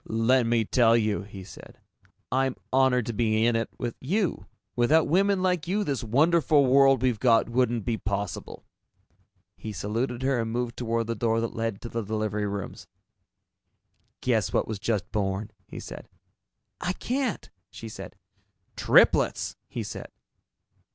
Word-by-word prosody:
"Let 115 +2 +2
me 115 -1 +2
tell 115 0 +4
you," 110 -2 0
he 100 -1 -10
said, - - -13 0.5
"I'm 130 0 +1 0.2
honored 130 -3 +3
to 120 - -3
be 110 0 +1
in 120 0 +2
it 115 0 -1
with 120 -2 -4
you. 165 - -1 0.3
Without 150 +7 +3
women 195 +3 +2
like 180 -4 0
you, 205 +4 0
this 140 - -2
wonderful 145 +4 +3
world 135 -1 +5
we've 125 -4 +1
got 115 -3 +4
wouldn't 120 -3 0
be 115 +1 -1
possible." 100 0 -4 0.9
He 110 - -6
saluted 120 +5 -3
her 135 -2 +1
and 115 -1 -2
moved 120 0 -2
toward 115 -1 -1
the 115 - -2
door 115 0 0
that 115 - -3
led 115 -3 -3
to - - -6
the 115 0 -3
delivery 105 0 -2
rooms. 100 -1 -6 1.3
"Guess - - +1
what - - 0
was 110 -3 -4
just 105 -3 -2
born," 100 +1 -2 0.2
he - - -8
said. - - -9 0.7
"I 180 0 -1
can't," 255 +3 -3 0.2
she 115 - -9
said. 110 - -9 0.6
"Triplets!" - - +3
he - - -4
said. - - -7
115 Hz, 155 wpm, -26 LUFS, 110-135 Hz, 1.3 s, world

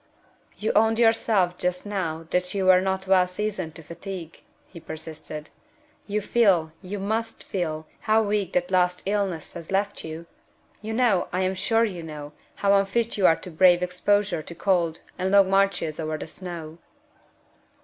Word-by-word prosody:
"You 215 - -1
owned 225 +1 +4
yourself 225 -6 +3
just 180 +1 -1
now 165 -6 -3
that 180 +1 0
you 195 -1 0
were 185 0 +6
not 190 0 -1
well 185 -1 +4
seasoned 185 -3 -4
to 165 - -9
fatigue," 170 0 -8 0.2
he 170 - -12
persisted. 155 -1 -8 0.6
"You 210 +1 -1
feel 195 -8 +3
(you 195 +3 -5
must 220 +3 -2
feel) 160 -4 -3
how 220 +1 +3
weak 205 -3 -1
that 270 0 0
last 180 -1 +2
illness 195 -5 -1
has 170 -2 -9
left 200 +1 -1
you? 160 +1 -7 0.6
You 220 +1 -4
know 225 -6 +2
(I 185 - 0
am 185 0 +1
sure 225 +4 +2
you 185 -6 -5
know) 150 -2 -8 0.2
how 200 0 +2
unfit 200 +4 +1
you 195 -3 +4
are 165 - +5
to 180 - -9
brave 175 +2 +5
exposure 180 0 +1
to 170 - -10
cold, 170 -3 +1 0.2
and 185 +1 0
long 195 -1 +5
marches 195 -5 +1
over 155 -1 -2
the - - -6
snow." 165 -1 -8
185 Hz, 170 wpm, -25 LUFS, 170-205 Hz, 0.6 s, were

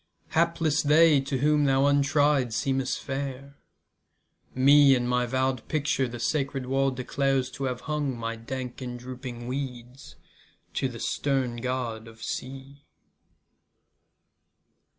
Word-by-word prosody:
Hapless 165 -2 +1
they 155 0 +5
To 135 0 -2
whom 150 +2 +3
thou 135 0 +3
untry'd 145 -3 +2
seem'st 135 -1 0
fair. 140 +1 -6 1.0
Me 140 +1 +6
in 120 -1 -1
my 125 0 +1
vow'd 130 -1 -1
Picture 145 -3 0
the 120 0 -7
sacred 135 +1 -1
wall 135 +1 +1
declares 130 0 -1
t' 135 +2 -4
have 125 -1 -3
hung 150 -5 -2
My 115 0 -3
dank 125 +2 -6
and 125 -1 -5
dropping 125 -1 -8
weeds 125 -1 -6 0.6
To 135 - 0
the 120 -2 -8
stern 130 -3 -1
God 120 -2 -3
of 115 0 -13
Sea. 135 +2 -6
135 Hz, 125 wpm, -27 LUFS, 125-140 Hz, 1.0 s, Me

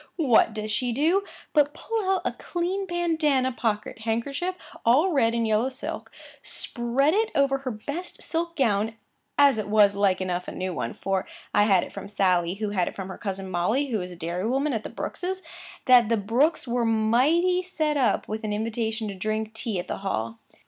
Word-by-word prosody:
what 250 -9 +4
does 215 0 -4
she 245 +3 0
do, 325 +11 +2 0.3
but 295 -1 +3
pull 445 -4 -2
out 380 -2 +1
a - - +1
clean 365 +3 -3
Bandanna 320 -7 +1
pocket 220 -3 -2
handkerchief 275 +11 -2 0.3
all 285 +11 +4
red 235 -6 +2
and 230 -1 +1
yellow 220 +3 +2
silk, 255 - -6 0.3
spread 245 +5 0
it 440 +2 +2
over 275 -1 +3
her 270 -1 -4
best 285 +10 -6
silk 335 +1 -2
gown; 225 - +1 0.4
it 270 -8 +4
was, 205 -1 +5
like 200 -2 +2
enough, 180 -1 -2
a - - -4
new 185 0 -3
one, 115 - -3
for 195 -1 -2 0.3
I 205 - +5
had 195 -4 +4
it - - -8
from - - -7
Sally, 185 -3 +1
who 210 0 -3
had 185 -4 +1
it - - -5
from 195 -1 -6
her 190 - -7
cousin 195 -2 -4
Molly, 215 +11 +1
who 220 -5 -1
is 180 0 -7
dairy 175 +5 -2
woman 270 +3 +1
at 225 - -1
the - - -7
Brookes', 375 +1 -4 0.4
that 245 -3 +6
the 230 - +3
Brookes 245 +11 +1
were 240 0 0
mighty 255 +12 +3
set 315 -5 -1
up 250 -7 +1
with 220 +1 -4
an 210 -1 -2
invitation 220 0 -2
to 200 - -4
drink 215 +3 -3
tea 220 -2 -3
at 175 - -4
the - - -3
Hall. 115 - -3
230 Hz, 195 wpm, -26 LUFS, 205-290 Hz, 0.4 s, that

